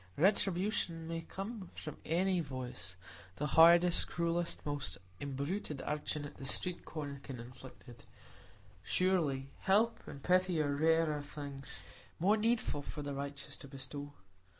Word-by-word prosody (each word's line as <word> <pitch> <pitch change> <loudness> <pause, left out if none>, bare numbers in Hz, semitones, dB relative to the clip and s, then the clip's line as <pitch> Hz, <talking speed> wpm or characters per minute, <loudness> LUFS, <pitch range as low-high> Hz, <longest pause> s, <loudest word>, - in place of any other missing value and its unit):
Retribution 180 -2 +2
may 165 0 -2
come 195 +3 -6
from 155 - -6
any 180 +3 +2
voice; 125 - -4 0.4
the 150 - -2
hardest, 170 +1 +7
cruelest, 170 0 -1
most 145 -6 -2 0.2
imbruted 140 +3 -3
urchin 150 0 -1
at 145 - -9
the 135 - -7
street 180 +6 0
corner 145 -3 -5
can 130 -4 -7
inflict 125 +2 -11
it; 120 -1 -13 0.7
surely 150 -8 +1
help 215 +4 +3
and 140 - -8
pity 180 -2 +3
are 145 -2 +2
rarer 160 0 +3
things, 140 - -6 0.4
more 195 +6 +4
needful 220 -8 +1
for 150 +1 -6
the 145 0 -3
righteous 140 0 -4
to - - -9
bestow. 140 +1 -5
150 Hz, 135 wpm, -35 LUFS, 140-180 Hz, 0.7 s, hardest